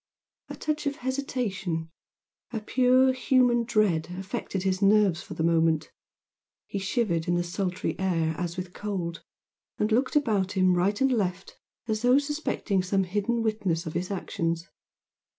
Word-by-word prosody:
A - - -6
touch 305 -1 -2
of 285 - -1
hesitation 195 - -2 0.6
of 220 -3 -5
pure 255 +2 +4
human 250 -2 +3
dread 210 -9 +2
affected 190 0 -4
his 190 0 0
nerves 200 -4 +4
for - - -9
the 160 - -1
moment, 165 -2 +2 0.7
he 200 - -4
shivered 190 -5 0
in 175 - +2
the 175 - +1
sultry 180 +1 -2
air 165 -4 +1
as 170 +1 -4
with 180 0 -5
cold, 180 -5 -4 0.6
and 210 +1 0
looked 250 +7 +1
about 210 -10 +1
him 185 -2 +3
right 190 +4 +1
and 270 0 +3
left 190 -5 -2 0.3
as 215 -1 -1
though 250 +2 +5
suspecting 285 -9 -1
some 190 +1 +1
hidden 210 +5 -1
witness 200 -6 -1
of 160 - -5
his 180 +2 -2
actions. 170 -3 -2
195 Hz, 150 wpm, -27 LUFS, 175-235 Hz, 0.7 s, though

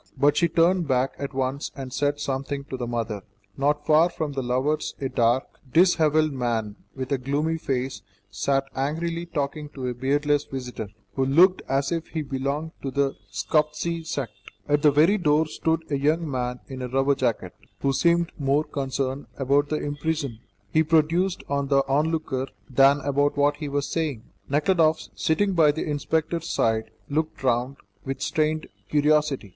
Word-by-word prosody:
But 140 +2 +4
she 170 - +3
turned 170 +1 +2
back 130 0 +1
at 140 -1 -4
once 135 +2 -1
and 130 -2 -7
said 145 +1 0
something 140 0 -3
to - - -2
the 125 -2 -4
mother. 115 -3 -3 0.3
Not 145 +2 0
far 160 +2 +5
from 155 -3 -3
the 135 -1 -2
lovers 130 +5 -1
a 135 - -2
dark, 120 +3 +2 0.3
dishevelled 155 -3 +4
man, 115 -5 -1 0.2
with 130 0 -5
a 140 - +1
gloomy 150 +5 -1
face, 130 -2 -2 0.3
sat 135 +7 +1
angrily 165 +5 -2
talking 150 -1 -3
to 130 -2 -5
a - - -2
beardless 145 +3 +1
visitor, 125 -5 -6 0.3
who 135 - 0
looked 175 +8 +5
as 135 +1 +1
if 165 -1 -2
he 160 -2 -3
belonged 140 +3 -3
to 135 - -3
the 140 0 +1 0.2
Scoptsy 150 - 0
sect. 140 -8 -3 0.4
At 145 0 +2
the 150 - +6
very 160 +9 +4
door 155 -1 +3
stood 160 +1 -1
a 140 - +1
young 155 +4 +1
man 125 -2 -3
in 130 -1 -7
a 125 - -3
rubber 135 +2 +2
jacket, 115 -9 -1 0.3
who 135 -1 +1
seemed 170 +2 +2
more 140 +2 +2
concerned 135 -1 -3
about 140 +2 +2
the 155 - 0
impression 145 -4 -3 0.3
he 160 - +5
produced 165 +4 +2
on 140 0 -1
the 135 0 +3
onlooker 145 -2 0 0.2
than 135 +2 +4
about 145 +1 +1
what 145 0 +3
he 150 -2 -4
was 140 0 -1
saying. 150 -9 -2 0.3
Nekhludoff, 155 +2 +2
sitting 195 +5 +1
by 160 -4 +5
the 160 +2 -4
inspector's 160 +3 -1
side, 110 0 +1 0.2
looked 155 -1 -2
round 125 +2 +1 0.3
with 135 -1 -4
strained 155 0 0 0.2
curiosity. 150 -6 +2
145 Hz, 170 wpm, -25 LUFS, 135-155 Hz, 0.4 s, the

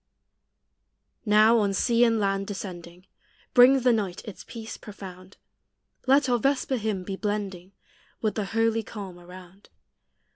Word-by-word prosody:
Now, 215 +2 +5
on 200 -2 +1
sea 235 +3 +3
and 230 -1 +2
land 195 -1 0
descending, 180 -3 -8 0.5
Brings 255 +1 +6
the 250 -1 +5
night 195 -5 -2
its 210 - -9
peace 225 -2 -8
profound: 190 -2 -11 0.7
Let 275 +1 +4
our 245 -1 +2
vesper 270 +1 0
hymn 210 -4 -2
be 195 +1 -5
blending 195 -3 -4 0.5
With 215 -2 -1
the 215 - -2
holy 225 +2 +1
calm 195 -5 -9
around. 180 +2 -14
210 Hz, 135 wpm, -26 LUFS, 190-225 Hz, 0.7 s, Brings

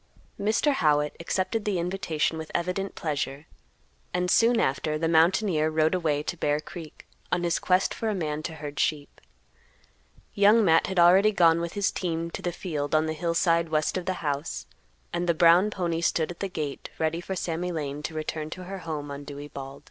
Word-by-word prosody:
Mr. 220 +8 +2
Howitt 150 - +2
accepted 190 +6 -1
the 205 -3 0
invitation 170 -3 -1
with 160 - -7
evident 180 +3 -2
pleasure, 145 -2 -3 0.7
and, 180 0 +1
soon 230 0 +4
after, 150 +3 0
the 165 +1 0
mountaineer 165 0 +3
rode 155 +1 +2
away 155 -5 0
to 175 - -3
Bear 150 -2 0
Creek, 155 0 -10 0.3
on 180 -1 +1
his 170 0 +1
quest 185 +1 +2
for 225 - -2
a 210 - -1
man 155 -4 -2
to 160 +1 -5
herd 150 -1 -7
sheep. 145 -2 -1 1.1
Young 210 +2 +5
Matt 165 -2 +4
had 190 - -4
already 185 +5 +6
gone 170 -4 +4
with 170 0 -4
his 200 -1 +1
team 170 -2 -3
to - - -6
the 175 - -2
field 155 -4 -3
on 155 0 +3
the 155 - -2
hillside 165 +1 +1
west 155 -1 0
of 185 -1 -3
the 185 - +1
house, 145 +2 -2 0.5
and 175 0 -1
the 170 - +3
brown 175 +5 +6
pony 170 -4 -2
stood 165 -1 +1
at 175 - -11
the 195 - -2
gate 150 -5 -5
ready 160 +1 -1
for 190 +2 -4
Sammy 175 0 -2
Lane 145 -3 -4
to 155 +1 -5
return 155 0 -3
to 185 +3 -7
her 195 +2 -6
home 155 -4 -5
on 140 0 -6
Dewey 145 +1 -8
Bald. 135 0 -8
165 Hz, 195 wpm, -27 LUFS, 155-180 Hz, 1.1 s, already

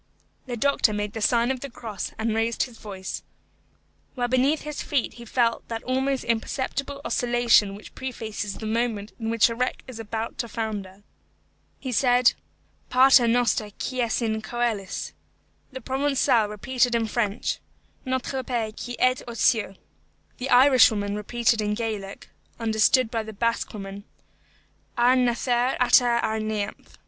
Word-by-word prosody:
The 245 -1 -4
doctor 260 -3 +2
made 210 0 -3
the 225 - -5
sign 235 +3 +3
of 260 - -3
the 280 - -6
cross 225 -5 -6
and 220 0 -1
raised 225 +1 0
his 240 -3 -9
voice, 190 -3 -6 0.9
while 245 -2 0
beneath 260 +5 +2
his 300 0 -5
feet 280 -5 -1
he 235 - -11
felt 230 0 0
that 225 -1 -5
almost 265 +1 0
imperceptible 275 +4 -2
oscillation 240 -4 +3
which 210 - -12
prefaces 220 -5 -5
the 220 - -7
moment 220 -2 -1
in 225 -1 -3
which 230 -1 +4
a 230 - -3
wreck 250 +2 -2
is 250 -3 -9
about 225 +1 -5
to 235 - -2
founder. 205 -4 -5 0.8
He 260 - -5
said, 250 0 +4 0.6
"Pater 255 -1 +6
noster 235 -2 +2
qui 255 -1 -2
es 235 0 0
in 220 -1 -1
coelis." 220 -3 -3 0.6
The 260 0 -7
Provençal 265 -4 +1
repeated 245 +3 0
in 230 -1 +1
French, 215 -1 -1 0.4
"Notre 260 +1 -2
Père 235 -4 -2
qui 245 0 -6
êtes 255 0 +3
aux 235 -1 -7
cieux." 220 -5 +2 0.6
The 260 +2 -3
Irishwoman 245 -6 +5
repeated 230 +2 +1
in 210 0 -1
Gaelic, 210 -4 -5 0.3
understood 225 +2 +3
by 230 - -1
the 220 0 -8
Basque 230 +3 -1
woman, 200 -1 -8 0.9
"Ar 245 +2 +5
nathair 245 0 +1
ata 250 0 +5 0.2
ar 220 0 0
neamh." 215 -2 -4
235 Hz, 150 wpm, -25 LUFS, 215-250 Hz, 0.9 s, Pater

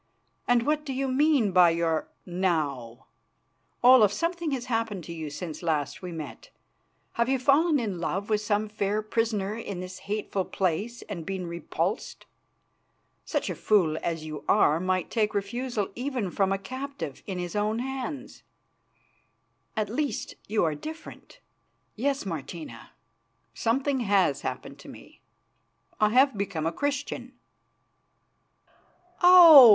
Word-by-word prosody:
And 245 -1 +4
what 300 0 +1
do 275 -3 -4
you 270 +1 -1
mean 265 -5 +3
by 180 -1 +6
your 165 -1 0 0.2
'now'? 150 -10 -2 0.8
Olaf, 245 -5 +7
something 335 - -2
has 260 -4 -3
happened 225 -6 -2
to 170 - -7
you 160 -2 -5
since 155 +2 -6
last 155 -5 -1
we 180 -1 -6
met. 165 - -8 0.7
Have 235 - +2
you 265 - +3
fallen 285 +4 +3
in 205 -7 -3
love 195 +4 -2
with 215 -1 +1
some 210 0 0
fair 210 0 -1
prisoner 215 -2 -1
in 200 -5 -6
this 185 0 -7
hateful 205 -2 -1
place 195 +7 -2
and 180 -6 -6
been 190 +1 -4
repulsed? 170 0 -3 1.0
Such - - -1
a - - -1
fool 180 -8 +2
as 165 -2 -3
you 155 -1 -7
are 155 +2 +4
might 185 0 -1
take 215 -2 0
refusal 210 +1 -2
even 245 -6 -3
from 195 +1 +1
a 195 - +1
captive 260 - -6
in 190 -2 -4
his 175 0 -4
own 210 +1 0
hands. 265 +2 -5 1.4
At 215 -1 +1
least 275 +7 -2
you 215 -1 +1
are 160 -2 +1
different." 315 - -10 0.5
"Yes, 275 +1 -1
Martina, 155 -7 -7 0.6
something 265 - 0
has 195 - +2
happened - - -6
to - - -12
me. - - -14 0.8
I 215 - +4
have 260 +3 +4
become 185 -6 -2
a 165 - +1
Christian." 285 +5 -3 1.9
"Oh! 340 -8 +11
210 Hz, 140 wpm, -27 LUFS, 175-255 Hz, 1.9 s, Oh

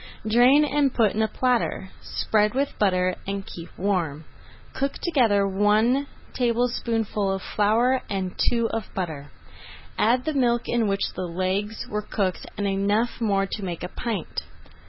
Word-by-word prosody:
Drain 250 +7 +5
and 285 -1 +2
put 220 -4 +4
in 220 - 0
a 220 - +3
platter. 245 -6 0
Spread 210 +1 0
with 275 +1 0
butter 185 -3 +2
and 195 0 -3
keep 170 0 -9
warm. 170 -6 -1 0.5
Cook 275 +1 -1
together 225 - +2
one 215 +8 +2 0.3
tablespoonful 235 -4 0
of 195 -1 -3
flour 235 +5 +3
and 190 -2 -2
two 235 -1 +1
of 225 -3 -4
butter, 155 -6 -4 0.7
add 245 +3 +3
the 310 - -1
milk 240 -3 +2
in 235 -2 +1
which 195 0 -1
the 185 - -4
legs 190 +5 -2
were 210 0 -2
cooked 195 -3 -2
and 205 - -1
enough 205 +5 0
more 200 -3 +2
to 200 +1 -5
make 175 -3 -4
a 180 - -4
pint. 220 -5 -4
210 Hz, 155 wpm, -25 LUFS, 195-240 Hz, 0.7 s, Drain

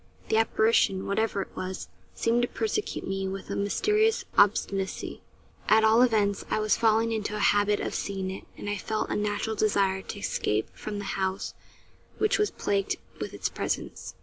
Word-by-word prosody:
The 220 - +3
apparition, 220 -3 +3
whatever 200 -1 0
it - - -19
was, 185 0 -5 0.3
seemed 230 +1 +2
to 245 - +1
persecute 425 - -2
me 195 0 -2
with 195 +1 -5
a - - -1
mysterious 420 - +2
obstinacy; 195 -1 +1 0.5
at 220 0 +6
all 220 +2 +6
events, 210 -5 +2
I - - +1
was 215 0 +3
falling 225 0 +3
into 210 -1 -2
a - - -3
habit 205 0 +2
of - - -3
seeing 190 -2 -3
it; 190 - -8
and - - -7
I 205 0 -1
felt 215 +3 -2
a - - 0
natural 210 +1 -1
desire 200 -3 +2
to 205 - -7
escape 110 - -1
from 210 -1 -5
the 205 - -4
house 190 0 -2 0.6
which 425 -1 +2
was 420 - +3
plagued 200 -1 -1 0.2
with - - -4
its - - -1
presence. - - -4
205 Hz, 175 wpm, -28 LUFS, 195-225 Hz, 0.6 s, at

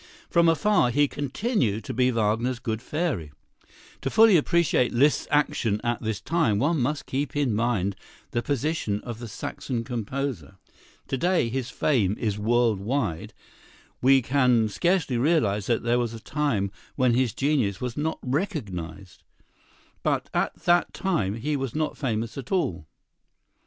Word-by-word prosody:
From 170 -2 +5
afar 165 -3 +3
he 145 +4 +3
continued 140 - -1
to - - -5
be 125 +2 +3
Wagner's 115 +2 0
good 115 -2 -3
fairy. 150 - -2 0.7
To 135 - -1
fully 220 +4 +6
appreciate 165 -5 +2
Liszt's 140 +5 +2
action 115 -7 +1
at 120 -1 -1
this 110 -2 -2
time, 120 -4 +1
one 145 +5 +1
must 145 +4 -1
keep 140 +2 -3
in 140 -6 +1
mind 105 -4 0 0.4
the 120 -3 0
position 140 -5 -1
of 120 -2 -7
the 120 - -6
Saxon 115 +3 -4
composer. 115 - -4 0.5
To 135 - -1
day 175 -6 +2
his 130 +1 -3
fame 110 -8 +1
is 105 -3 -2
world 115 -1 +2
wide; 105 - -2 0.7
we 135 0 +5
can 125 -4 +3
scarcely 160 - +1
realize 115 - +1
that 120 - +1
there 120 +1 +2
was 115 -1 -2
a - - -8
time 115 -5 -1 0.2
when 125 -2 +3
his 125 -1 +2
genius 135 -9 +1
was 125 -2 -4
not 160 +2 -1
recognized, 100 - -4 0.8
but - - -1
at - - 0
that 175 0 +2
time 155 - 0
he 145 +7 -2
was 135 -4 -3
not 155 0 -1
famous 115 -1 -3
at 130 - -9
all. 90 - -1
125 Hz, 150 wpm, -25 LUFS, 110-145 Hz, 0.8 s, fully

